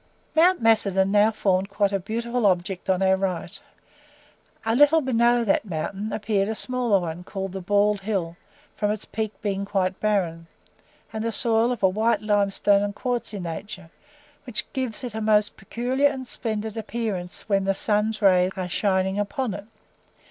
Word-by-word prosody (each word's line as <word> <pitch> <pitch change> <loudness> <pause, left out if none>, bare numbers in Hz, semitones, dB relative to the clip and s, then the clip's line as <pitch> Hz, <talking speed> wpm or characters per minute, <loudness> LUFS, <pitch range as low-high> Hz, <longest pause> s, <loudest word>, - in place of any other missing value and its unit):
Mount 350 +3 +5
Macedon 200 -4 +3
now 210 +1 +5
formed 195 -3 0
quite 200 0 +1
a 195 - 0
beautiful 235 +3 -1
object 185 0 -1
on 190 0 +2
our 190 0 +4
right: 190 -1 -3 1.0
a 225 0 +1
little 290 +4 +6
below 240 -2 +2
that 205 -2 +2
mountain 195 +3 -4
appeared 205 -2 0
a 220 - -2
smaller 245 -3 +2
one, 170 0 -5
called 195 0 -5
the 190 0 -6
Bald 205 +2 +2
Hill, 190 -5 -2 0.4
from 205 - 0
its 210 0 -2
peak 220 -1 -3
being 200 -1 -1
quite 190 -2 -1
barren, 175 -6 -1 0.7
and 220 0 -3
the 230 - -1
soil 230 +1 +2
of 240 -5 -4
a - - +7
white 215 +3 +1
limestone 205 -1 +3
and 205 0 -2
quartzy 240 -4 -3
nature, 180 +1 -7 0.5
which 245 -4 -2
gives 260 -2 -3
it 245 -3 -5
a 220 - -4
most 210 -1 +2
peculiar 250 +7 0
and 260 -2 -6
splendid 220 -3 -3
appearance 220 -5 -4
when 195 -2 +1
the 195 0 +1
sun's 215 +2 0
rays 185 -2 +5
are 185 -1 -2
shining 190 +1 0
upon 225 +2 -2
it. 200 +1 -7
205 Hz, 170 wpm, -24 LUFS, 190-225 Hz, 1.0 s, a